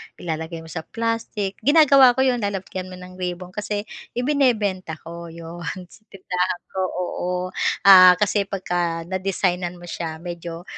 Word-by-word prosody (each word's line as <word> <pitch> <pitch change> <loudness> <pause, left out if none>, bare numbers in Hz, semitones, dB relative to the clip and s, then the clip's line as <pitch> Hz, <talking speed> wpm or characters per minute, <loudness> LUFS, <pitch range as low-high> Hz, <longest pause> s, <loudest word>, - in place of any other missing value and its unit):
ilalagay 165 0 -5
mo 160 - -11
sa 160 -1 -6
plastic, 230 -3 -3
ginagawa 275 -1 +6
ko 265 - +2
yun, 255 -2 +2
lalagyan 195 -3 -4
mo 185 - -9
ng 180 0 -12
ribon 180 0 -4
kasi, 210 +1 -3 0.3
ibinebenta 235 - +1
ko, 170 +1 -8
'yon 165 +1 -9 0.3
sa - - -17
tindahan 180 -2 -2
ko 190 - -4
oo, 180 0 -3 0.5
ah, 185 -2 +9
kasi 205 +1 +1
pagka 175 -3 -2
na-designan 180 -1 -1
mo 175 - -14
siya 170 -2 -5
medyo 170 0 -7
185 Hz, 145 wpm, -22 LUFS, 175-205 Hz, 0.5 s, ah